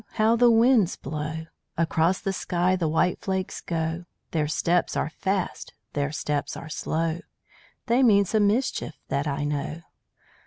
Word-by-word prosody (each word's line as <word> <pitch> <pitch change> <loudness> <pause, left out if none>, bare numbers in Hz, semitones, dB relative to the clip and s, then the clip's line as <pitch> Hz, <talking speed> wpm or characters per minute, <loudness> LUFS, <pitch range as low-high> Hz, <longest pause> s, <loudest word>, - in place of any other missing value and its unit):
How 220 +1 +3
the 240 +1 +5
winds 230 -4 +4
blow. 155 +3 -5 0.3
Across 165 +2 +2
the 195 -1 -1
sky 180 0 +1
the 175 -3 0
white 160 +3 +1
flakes 190 -1 -3
go. 165 +1 -2 0.3
Their 155 -3 0
steps 170 +3 +1
are 160 - -1
fast 190 +2 -3 0.2
their 145 0 -1
steps 145 -2 -2
are 165 - -8
slow 160 +2 -1 0.7
They 245 +2 +3
mean 205 -5 +5
some 205 +1 +2
mischief, 215 - 0
that 140 +3 0
I 145 0 -1
know. 145 +2 -3
170 Hz, 150 wpm, -26 LUFS, 155-200 Hz, 0.7 s, the